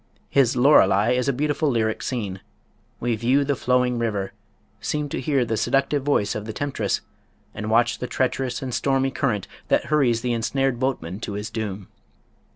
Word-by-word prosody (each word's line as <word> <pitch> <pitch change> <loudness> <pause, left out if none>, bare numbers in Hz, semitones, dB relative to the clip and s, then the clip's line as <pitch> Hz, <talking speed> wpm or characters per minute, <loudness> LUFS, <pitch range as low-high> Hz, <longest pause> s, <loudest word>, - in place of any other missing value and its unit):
His 130 -3 +3
"Lorelei" 115 -6 +5
is 125 +1 +1
a - - +4
beautiful 145 +2 0
lyric 110 -3 0
scene. 105 -7 -3 0.6
We 120 -1 0
view 125 +6 +2
the 140 0 +1
flowing 125 -1 +1
river, 105 -4 -2 0.5
seem 150 -1 -2
to - - -3
hear 135 -2 +1
the 115 -1 -1
seductive 140 +5 +1
voice 135 -7 +1
of 105 - -5
the 110 - -5
temptress, 115 -7 -1 0.5
and 105 - -5
watch 115 +2 +2
the 125 - -3
treacherous 130 0 -1
and 130 -2 -4
stormy 135 +2 +1
current 115 -8 -1 0.2
that - - +2
hurries 125 -6 +3
the 125 -1 0
ensnared 125 +2 0
boatman 105 -9 -2
to 105 - -5
his 105 +1 -5
doom. 105 -4 -4
125 Hz, 170 wpm, -23 LUFS, 110-135 Hz, 0.6 s, Lorelei